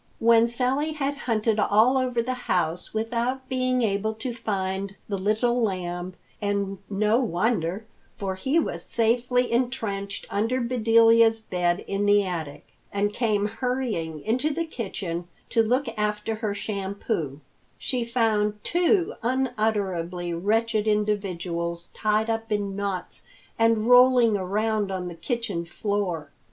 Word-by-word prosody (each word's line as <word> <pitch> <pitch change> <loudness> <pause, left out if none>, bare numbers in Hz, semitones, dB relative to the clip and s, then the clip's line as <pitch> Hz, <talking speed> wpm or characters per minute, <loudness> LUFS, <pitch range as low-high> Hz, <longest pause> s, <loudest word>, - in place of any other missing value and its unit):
When 230 0 +5
Sally 260 +6 0
had 285 -1 -2
hunted 220 -1 +2
all 220 +5 +4
over 250 -3 +1
the 255 +2 -2 0.2
house 175 -1 0
without 240 +4 -2
being 255 -1 +1
able 215 +1 0
to 245 +2 -4
find 195 -3 -3
the 200 - -2
Little 220 +5 +1
Lamb—and 190 +1 -3
no 210 +3 +2
wonder, 200 -2 0 0.3
for 195 -2 -3
he 265 - 0
was 170 - 0
safely 245 +2 +2
entrenched 225 -5 -2
under 225 +5 0
Bedelia's 230 -1 +4
bed 180 -3 0
in 200 +1 -1
the 205 0 +5
attic—and 175 +5 -4
came 210 -4 +1
hurrying 220 - -2
into 250 - 0
the 330 +3 -1
kitchen 190 - -5 0.2
to 230 - +3
look 250 +5 +1
after 210 +1 -1
her 215 -2 -3
shampoo, 195 - -3 0.4
she 250 -2 -2
found 220 -3 +1
two 350 +1 +2
unutterably 205 -8 -1
wretched 220 +4 +1
individuals 180 -5 -1
tied 215 0 +1
up 225 0 -2
in 200 -2 -1
knots 200 -3 -2 0.3
and 225 -1 +3
rolling 245 -2 +6
around 205 +2 0
on 180 -1 -3
the - - -7
kitchen 205 -1 -3
floor. 175 -4 -2
215 Hz, 125 wpm, -25 LUFS, 195-235 Hz, 0.4 s, rolling